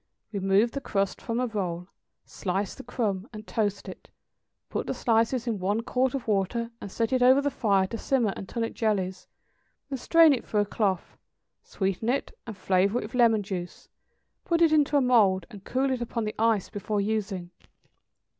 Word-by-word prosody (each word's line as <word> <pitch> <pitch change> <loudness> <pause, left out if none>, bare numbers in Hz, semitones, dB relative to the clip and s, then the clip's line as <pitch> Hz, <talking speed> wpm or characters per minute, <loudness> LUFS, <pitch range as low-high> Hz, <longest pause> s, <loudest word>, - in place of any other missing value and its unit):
= - - -56
Remove 200 +3 +2
the 275 - -4
crust 195 -5 -1
from 230 0 -2
a 255 - +1
roll, 180 -6 -3 0.4
slice 195 +1 -3
the - - -10
crumb, 215 -5 -2
and 215 -2 -9
toast 205 -3 -2
it; - - -10 0.6
put - - -3
the - - -2
slices 230 +1 +1
in 225 -4 -2
one 200 +4 0
quart 255 +2 0
of 265 - -5
water, 220 +3 0
and 200 - -7
set 230 +4 -1
it 255 - +2
over 260 +2 +6
the 285 0 0
fire 200 -7 +2
to 225 +4 -6
simmer 240 -7 +1
until 230 +4 -4
it 225 - -3
jellies; 190 -4 -1 0.6
then 270 - -1
strain 330 +2 +6
it 255 - -2
through 210 - 0
a - - 0
cloth, 195 -3 -2 0.4
sweeten 195 +3 -2
it, 270 +3 -1
and 220 -4 -7
flavor 190 +3 +2
it - - -2
with 210 - -9
lemon 230 -4 +4
juice; 180 -3 -6 0.5
put 335 -2 +1
it 330 -2 +5
into 295 -1 +3
a - - +4
mould 205 -8 +4
and 200 -2 -12
cool 265 +2 0
it 255 -2 -2
upon 235 -1 -2
the 215 0 -3
ice 225 -3 +2
before 205 +1 -3
using. 200 -4 -2
220 Hz, 190 wpm, -27 LUFS, 195-245 Hz, 0.6 s, over